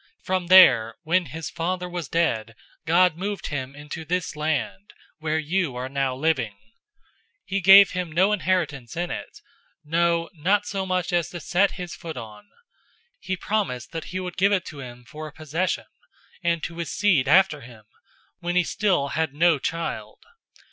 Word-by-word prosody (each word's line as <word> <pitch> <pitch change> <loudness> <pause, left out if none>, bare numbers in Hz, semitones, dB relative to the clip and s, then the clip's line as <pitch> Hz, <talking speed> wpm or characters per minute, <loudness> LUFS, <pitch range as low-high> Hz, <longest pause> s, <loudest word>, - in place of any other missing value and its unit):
From 185 -2 -1
there, 130 -12 +7
when 175 +1 +1
his 160 +4 -6
father 180 +2 -2
was 175 -4 -5
dead, 115 -10 0 0.3
God 175 0 +4
moved 200 0 -4
him 135 -2 -4
into 150 +2 -7
this 175 +1 -2
land, 155 +6 -3 0.3
where 155 0 -1
you 160 -2 -1
are 125 +1 -4
now 135 -1 -1
living. 130 -7 0
007:005 - - -32 0.9
He 195 +1 -2
gave 195 +2 +9
him 180 -2 -3
no 185 +6 +3
inheritance 165 - -1
in 175 0 -2
it, - - -7 0.5
no, 170 +1 +1
not 195 +6 +1
so 195 -2 -3
much 185 -1 -1
as 175 -2 +1
to 175 - -7
set 180 +5 +1
his 180 -2 -7
foot 160 -5 -8
on. 110 - -10 0.7
He 190 - -3
promised 190 - -2
that 165 -1 -5
he 185 - -5
would 180 -1 -6
give 195 +2 +3
it 195 -3 +1
to 150 - -9
him 125 -2 -10
for 155 +5 -8
a - - -10
possession, 160 +5 -2 0.6
and 170 -1 0
to 165 - -5
his 170 - -3
seed 175 -10 +2
after 165 -1 +4
him, 120 -3 -14 0.6
when 175 +1 -3
he 180 - +4
still 180 -7 0
had 160 -2 -2
no 165 -1 +4
child. 165 +5 -4
165 Hz, 175 wpm, -24 LUFS, 145-185 Hz, 0.9 s, gave